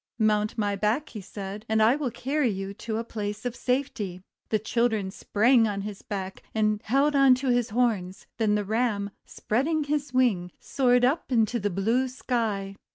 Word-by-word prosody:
'Mount 215 -1 +1
my 205 -2 0
back," 220 +10 0
said 195 +1 -7
he, - - -24
"and 220 0 +2
I 230 +4 +5
will 290 -3 -2
carry 270 +3 0
you 195 -1 -4
to 220 +2 -4
a 230 - -2
place 210 -1 -5
of 245 -1 -2
safety." 250 -9 -2 0.3
The 215 - +2
children 220 -2 0
sprang 225 +4 +3
on 200 -1 -2
his 205 -1 -6
back, 195 -2 -5
and 215 -1 +1
held 275 +5 +2
on 275 -2 +6
to 260 +1 -2
his 245 -2 +2
horns; 210 -5 0
then 215 -2 +3
the 205 -1 -1
Ram, 215 -2 0 0.2
spreading 300 +8 0
his 290 -1 -2
wings, 215 -9 +1
soared 250 -2 +2
up 275 +3 0
into 235 0 +2
the 205 0 0
blue 225 +8 +1
sky. 220 -6 -2
220 Hz, 180 wpm, -26 LUFS, 205-250 Hz, 0.3 s, on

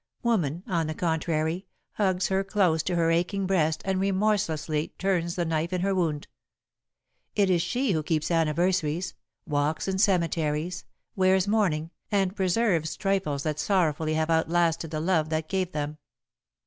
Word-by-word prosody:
Woman, 180 - 0
on 165 -4 -1
the 155 - -4
contrary, 160 +2 -1 0.2
hugs 190 -3 0
hers 195 0 0
close 180 -6 +2
to 180 +2 -2
her 165 -1 +2
aching 180 +4 0
breast 160 -5 +1
and 190 -1 0
remorselessly 190 -6 0
turns 175 -3 0
the 175 - -1
knife 160 +1 -1
in 180 - 0
her 195 +1 +1
wound. 160 -6 -1 1.1
It 200 -2 +3
is 175 -2 +3
she 245 +8 0
who 160 -4 +1
keeps 155 +1 -1
anniversaries, 170 +1 +1 0.3
walks 150 +3 -1
in 190 0 -1
cemeteries, 170 -4 0 0.3
wears 190 0 +3
mourning, 175 -7 +1 0.2
and 195 -2 +1
preserves 185 -4 +1
trifles 190 -8 -1
that 150 -1 -2
sorrowfully 155 -3 +1
have 160 +1 0
outlasted 165 0 +1
the 155 -1 -3
love 160 -2 +1
that 155 0 -1
gave 185 -1 -1
them. 150 -1 -4
170 Hz, 150 wpm, -27 LUFS, 155-190 Hz, 1.1 s, It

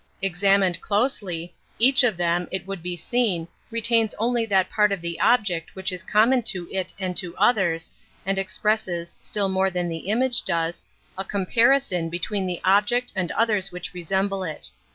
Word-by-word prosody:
Ex 180 -1 -1
amined 195 -3 +3
closely, 195 -6 -1 0.2
each 265 +4 +4
of 220 -7 +2
them, 175 0 0
it 190 -1 -3
would 195 -2 -6
be 175 +1 -4
^Eteen, 190 -4 -1 0.2
retains 230 -1 +2
only 235 +1 0
that 190 -3 +3
part 210 -1 +2
of 200 - -1
the 170 0 -5
object 205 -9 +2
^Khich 190 0 -1
is 180 -1 -4
common 230 +6 +3
to 180 -6 -2
it 185 -2 -2
and 185 -2 -3
to 175 -1 -4
others, 175 -8 +2 0.3
and 195 +1 0
^"fecpresBes, 195 -4 -1
still 205 -2 0
more 190 0 +1
than 180 -1 -2
the 165 +3 -5
image 245 +3 +1
does, 165 0 -1 0.4
a - - -1
comparison 205 -2 +2
between 185 +3 -2
the 180 -1 -4
object 210 +6 +2
and 180 -3 -1
others' 210 -4 +1
w 180 - -8
hich 180 - -8
resemble 190 +2 -1
it. 160 -4 -3
195 Hz, 175 wpm, -24 LUFS, 175-220 Hz, 0.4 s, each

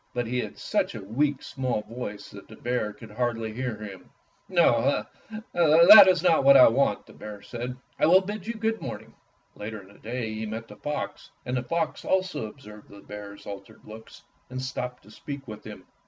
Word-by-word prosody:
But 120 0 0
he 125 +2 -2
had - - -5
such - - -1
a - - -7
weak, 135 +7 0
small 130 -5 -2
voice 110 -4 -7
that 100 - -12
the 110 - -12
bear 120 -3 -2
could 105 +1 -13
hardly 115 -1 -2
hear 125 -1 -3
him. 100 -4 -10 0.4
"No, - - +3 0.5
that 175 +5 +9
is 180 -2 +3
not 165 -5 +4
what 140 0 +8
I 130 - +9
want," 120 -3 +1
the - - -16
bear 105 -1 -9
said. 125 +1 -6 0.2
"I - - +4
will 185 +3 +7
bid 205 +1 -6
you 235 - -3
good 225 0 -1
morning." - - -7 0.4
Later 110 +1 -6
in 95 -1 -15
the 100 - -18
day 115 0 -4
he 110 0 -4
met 110 +2 -6
the 105 - -12
fox, 150 0 -5 0.2
and 125 0 -2
the 125 - 0
fox 160 +5 -2
also 185 -10 0
observed 105 -3 -13
the 100 0 -13
bear's 100 -1 -10
altered 100 -1 -9
looks 110 +1 -12 0.3
and 130 0 -5
stopped 125 -1 -5
to 105 - -17
speak 140 +1 -8
with 105 -1 -9
him. - - -10
120 Hz, 200 wpm, -26 LUFS, 105-145 Hz, 0.5 s, that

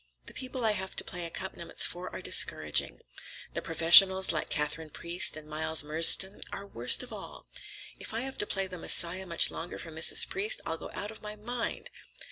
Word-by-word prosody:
The - - -12
people 255 -2 -6
I 220 - +2
have 190 -2 -6
to - - -2
play 175 -1 -7
accompaniments 170 0 -2
for 180 +1 -6
are - - -10
discouraging. - - +2 0.5
The - - -5
professionals, 190 +4 +5
like - - -4
Katharine 155 +1 -4
Priest 170 +1 -2
and 155 -1 -13
Miles 160 0 0
Murdstone, 165 +6 +1
are 200 - -8
worst 125 - +3
of 250 - -12
all. - - -12 0.5
If - - -9
I 225 +1 -4
have 265 +1 -7
to 210 - -3
play 195 -1 -2
'The 185 -1 -9
Messiah' 180 +3 +2
much 170 - +1
longer 170 +2 -8
for 165 - -11
Mrs. 160 +1 +5
Priest, 425 +6 +1
I'll - - -5
go - - -11
out 205 +1 -6
of 220 - -15
my 210 0 -9
mind!" 230 +3 -7
185 Hz, 195 wpm, -27 LUFS, 165-210 Hz, 0.5 s, professionals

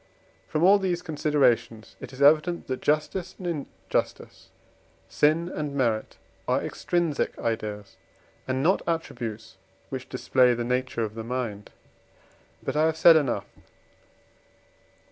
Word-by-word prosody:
From 155 - -1
all 200 +3 +7
these 180 -2 -1
considerations 125 -8 0
it - - -9
is 135 +1 -2
evident, 155 +4 +4
that 130 -1 -4
justice 160 +5 -1
and 185 - -9 0.4
injustice, - - -3 0.6
sin 155 +3 +2
and 150 -5 -4
merit, 115 -5 -1 0.3
are - - +2
extrinsic 170 -4 -1
ideas, 105 -3 -4 0.5
and 130 +1 -1
not 185 +5 +3
attributes 115 - -4 0.3
which 130 -1 -6
display 125 -1 +3
the 120 - -2
nature 125 -1 -1
of 110 -1 -4
the 115 0 -6
mind. 115 -4 -4 0.9
But - - -3
I 155 +1 +3
have 160 0 -1
said 165 0 +8
enough. 125 -10 +1
135 Hz, 125 wpm, -26 LUFS, 115-160 Hz, 0.9 s, said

